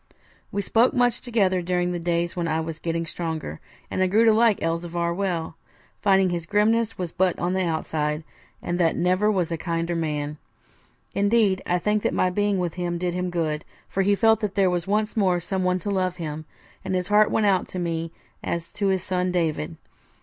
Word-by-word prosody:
We 200 - -1
spoke 235 +7 +3
much 245 -1 +2
together 195 -7 +1
during 180 0 0
the 175 - -2
days 170 0 -1
when 175 -2 -1
I 160 0 0
was 160 0 -5
getting 165 0 -2
stronger, 160 - -4 0.3
and - - -1
I 185 - +4
grew 215 +5 +4
to 225 - +6
like 225 -2 +4
Elzevir 170 +1 -1
well, 175 -4 -2 0.4
finding 195 -2 +4
his 170 -1 -3
grimness 220 +2 +2
was 180 -3 -3
but 185 0 +1
on 175 +1 -1
the 190 - +1
outside, 155 -2 -1 0.4
and 175 +1 -2
that 165 -2 +3
never 185 +4 +2
was 180 -5 0
a 165 - -1
kinder 170 0 -2
man. 150 -2 -2 0.8
Indeed, 200 -2 +2
I 180 - +2
think 210 +4 +1
that - - 0
my 185 - +2
being 205 +1 +1
with 175 -3 -1
him 175 -1 -2
did 175 0 -2
him 180 0 -2
good; 155 -3 -1 0.3
for 195 - 0
he 200 +1 +3
felt 220 +1 +4
that 210 -3 -3
there 190 -2 +3
was 175 0 -2
once 210 +2 0
more 185 -5 +2
someone 185 +1 0
to 205 - -2
love 185 -2 0
him, 155 -3 -5 0.4
and 190 -1 -2
his 180 +1 -2
heart 210 0 +5
went 220 - +1
out 190 -3 +2
to - - -7
me 165 -2 -2 0.3
as 170 -1 -3
to 210 -1 -1
his 190 -2 +1
son 180 0 -1
David. 165 - -1
180 Hz, 205 wpm, -24 LUFS, 170-200 Hz, 0.8 s, to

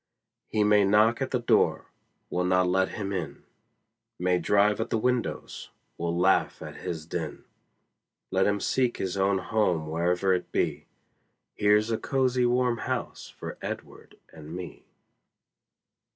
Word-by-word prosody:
He 105 -1 +1
may 105 -1 +5
knock 105 +5 +4
at 135 - -1
the 125 - +1
door 120 - +1 0.4
we'll 90 0 0
not 90 0 +3
let 95 +1 +2
him 100 -1 -4
in; 85 -6 -5 0.7
May 90 0 +1
drive 105 +4 +3
at 115 - -3
the - - +1
windows 125 +2 -2 0.3
we'll 85 0 -2
laugh 95 +2 +2
at - - -9
his 80 -3 -5
din; - - -5 0.9
Let 95 0 +2
him 100 0 +1
seek 125 +3 0
his 95 -1 -3
own 100 0 +2
home 95 -5 0
wherever 90 +3 +1
it 90 - -3
be; - - -1 0.7
Here's 105 +2 +3
a 110 - 0
cozie 130 -2 +1
warm 125 -1 +1
house - - -4
for - - -8
Edward - - -8 0.2
and 80 +1 -9
me. 90 -2 -8
100 Hz, 145 wpm, -27 LUFS, 90-115 Hz, 0.9 s, may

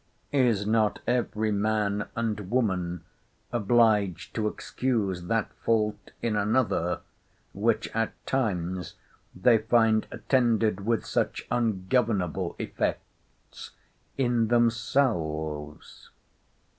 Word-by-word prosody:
Is 120 -7 +2
not 110 0 +2
every 110 -3 0
man 105 0 0
and 105 -4 -2
woman 90 -8 0 0.5
obliged 105 -5 +2
to 110 -1 0
excuse 105 -6 -2
that 110 +4 -1
fault 110 -2 0
in 115 -2 0
another, 105 -5 +1 0.5
which 110 +3 +1
at 115 0 0
times 95 - -2 0.4
they 110 +5 +4
find 110 0 +3
attended 115 -6 +1
with 115 -2 +1
such - - -1
ungovernable 110 -4 0
effects - - -6 0.4
in 120 -4 +2
themselves? 110 - -1
110 Hz, 90 wpm, -27 LUFS, 95-115 Hz, 0.5 s, they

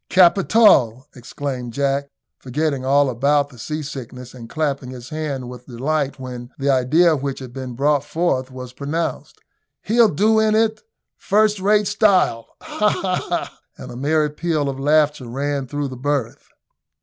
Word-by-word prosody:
"Capital!" 170 - +4
exclaimed 125 -1 -6
Jack, 140 +1 -1 0.3
forgetting 140 +1 -2
all 140 +2 +3
about 140 +3 +1
his 125 -3 -12
seasickness 135 -5 -6
and 115 -3 -11
clapping 140 -5 -2
his 125 -1 -9
hands 150 -4 -4
with 125 0 -10
delight 140 +3 -2
when 125 -2 -7
the 140 0 +1
idea 155 +6 +3
which 140 -1 -3
had 130 -2 -9
been 130 -2 -6
brought 145 +2 +2
forth 145 -5 -1
was 125 -1 -9
propounded; 150 +5 -3 0.5
"he'll 230 0 +4
do 215 +6 +3
in 215 0 +2
it 220 0 +1 0.4
first 210 0 +2
rate 205 +2 +3
style 195 - +2 0.2
ha, 210 0 0
ha, 185 -3 -1
ha!" - - -3 0.2
and 130 - -9
a - - -9
merry 150 +3 +1
peal 150 -2 -1
of 135 -1 -5
laughter 150 -2 +2
ran 140 +2 -3
through 145 +2 -3
the 130 - -7
berth. 140 -2 -3
140 Hz, 155 wpm, -20 LUFS, 130-160 Hz, 0.5 s, Capital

